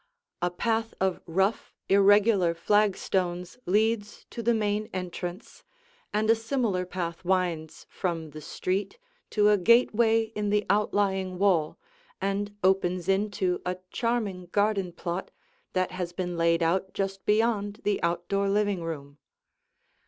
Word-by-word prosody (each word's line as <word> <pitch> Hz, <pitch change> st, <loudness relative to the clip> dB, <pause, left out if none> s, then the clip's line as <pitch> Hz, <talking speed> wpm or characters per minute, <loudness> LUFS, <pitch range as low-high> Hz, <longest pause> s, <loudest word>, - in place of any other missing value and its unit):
A 175 Hz, -, +2 dB
path 225 Hz, +5 st, -1 dB
of 190 Hz, -1 st, 0 dB
rough, 195 Hz, +6 st, 0 dB
irregular 200 Hz, -2 st, +4 dB
flagstones 185 Hz, -1 st, 0 dB
leads 210 Hz, +2 st, 0 dB
to 235 Hz, -, -5 dB
the 235 Hz, +1 st, +2 dB
main 210 Hz, 0 st, -1 dB
entrance, 180 Hz, +1 st, -6 dB, 0.5 s
and 215 Hz, +1 st, 0 dB
a 225 Hz, -, +7 dB
similar 225 Hz, -6 st, -1 dB
path 175 Hz, -2 st, -4 dB
winds 175 Hz, -4 st, -1 dB
from 165 Hz, -4 st, -3 dB
the 155 Hz, +1 st, -9 dB
street 195 Hz, -, -3 dB, 0.3 s
to 210 Hz, -1 st, +3 dB
a 210 Hz, -1 st, +4 dB
gateway 225 Hz, +2 st, +4 dB
in 210 Hz, -1 st, -2 dB
the 210 Hz, 0 st, +1 dB
outlying 195 Hz, -2 st, +1 dB
wall 180 Hz, -6 st, +2 dB, 0.4 s
and 200 Hz, +1 st, -2 dB
opens 185 Hz, -2 st, +2 dB
into 195 Hz, -2 st, 0 dB
a 180 Hz, 0 st, -2 dB
charming 215 Hz, -7 st, -1 dB
garden 200 Hz, -3 st, +1 dB
plot 175 Hz, +2 st, -4 dB, 0.4 s
that 185 Hz, -1 st, 0 dB
has 180 Hz, -1 st, -4 dB
been 180 Hz, -1 st, -3 dB
laid 170 Hz, 0 st, +2 dB
out 190 Hz, +3 st, 0 dB
just 195 Hz, -1 st, -3 dB
beyond 210 Hz, -1 st, +1 dB
the 205 Hz, -1 st, 0 dB
outdoor 195 Hz, +4 st, 0 dB
living 205 Hz, -2 st, +1 dB
room. 145 Hz, -3 st, -6 dB
195 Hz, 130 wpm, -27 LUFS, 180-210 Hz, 0.5 s, a